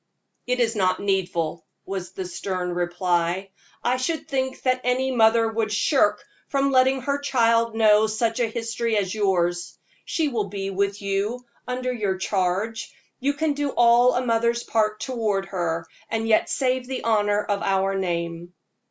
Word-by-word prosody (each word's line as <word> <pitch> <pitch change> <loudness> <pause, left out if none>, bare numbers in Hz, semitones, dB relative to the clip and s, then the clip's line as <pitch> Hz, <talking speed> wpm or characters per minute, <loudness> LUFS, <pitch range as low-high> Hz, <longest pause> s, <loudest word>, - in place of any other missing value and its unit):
"It 250 0 0
is 230 -1 +1
not 185 -2 +1
needful," 175 -5 -1 0.2
was 190 -2 -5
the 190 - -5
stern 180 0 -3
reply. 175 +1 -1 0.3
"I 250 +1 +2
should 315 +6 -2
think 265 -3 -2
that 255 -1 +1
any 255 +2 +1
mother 225 -1 +4
would 225 -1 -1
shrink 210 -1 +3 0.3
from 275 0 +1
letting 260 0 +3
her 280 +2 -1
child 230 -4 +2
know 215 -1 +5
such 225 +2 -1
a 235 - +2
history 230 0 -2
as 190 -3 -1
yours. 175 -4 0 0.3
She 320 -2 -1
will 225 -7 -2
be 195 -1 -4
with 200 +1 -1
you 205 +5 -2 0.2
under 255 0 -2
your 205 -5 -1
charge 195 +4 -1 0.3
you 280 +3 +1
can 300 +1 0
do 290 0 -1
all 240 +1 +5
a 250 - 0
mother's 235 0 +1
part 215 -1 0
toward 220 -6 -1
her, 170 -3 -2 0.2
and 225 0 -1
yet 220 -1 +3
save 255 -1 0
the 260 -1 -4
honor 210 -2 +2
of 200 -1 -2
our 195 0 +1
name." 175 -2 -3
220 Hz, 160 wpm, -24 LUFS, 190-250 Hz, 0.3 s, know